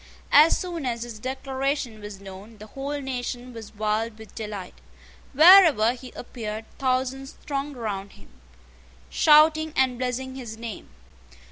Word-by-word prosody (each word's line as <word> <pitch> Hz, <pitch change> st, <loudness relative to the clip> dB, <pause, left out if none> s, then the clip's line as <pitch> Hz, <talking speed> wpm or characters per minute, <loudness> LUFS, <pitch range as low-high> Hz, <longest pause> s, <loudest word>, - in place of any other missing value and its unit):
As 305 Hz, +3 st, +6 dB
soon 340 Hz, -6 st, -4 dB
as 235 Hz, -1 st, -2 dB
his 235 Hz, -3 st, -9 dB
declaration 265 Hz, -1 st, -3 dB
was 205 Hz, -2 st, -9 dB
known, 200 Hz, +3 st, -12 dB
the 210 Hz, -, -11 dB
whole 275 Hz, +6 st, -5 dB
nation 250 Hz, -2 st, -5 dB
was 225 Hz, -2 st, -10 dB
wild 215 Hz, +1 st, -1 dB
with 220 Hz, 0 st, -13 dB
delight. 210 Hz, -4 st, -7 dB, 0.6 s
Wherever 310 Hz, -, +7 dB
he 255 Hz, 0 st, -11 dB
appeared 220 Hz, -3 st, -6 dB
thousands 265 Hz, +1 st, -1 dB
thronged 280 Hz, -1 st, -4 dB
round 200 Hz, -4 st, -5 dB
him, 100 Hz, -, -18 dB, 0.8 s
shouting 310 Hz, 0 st, +5 dB
and 255 Hz, -2 st, +1 dB
blessing 260 Hz, +1 st, -3 dB
his 240 Hz, -4 st, -8 dB
name. 230 Hz, -3 st, -8 dB
250 Hz, 135 wpm, -25 LUFS, 215-275 Hz, 0.8 s, Wherever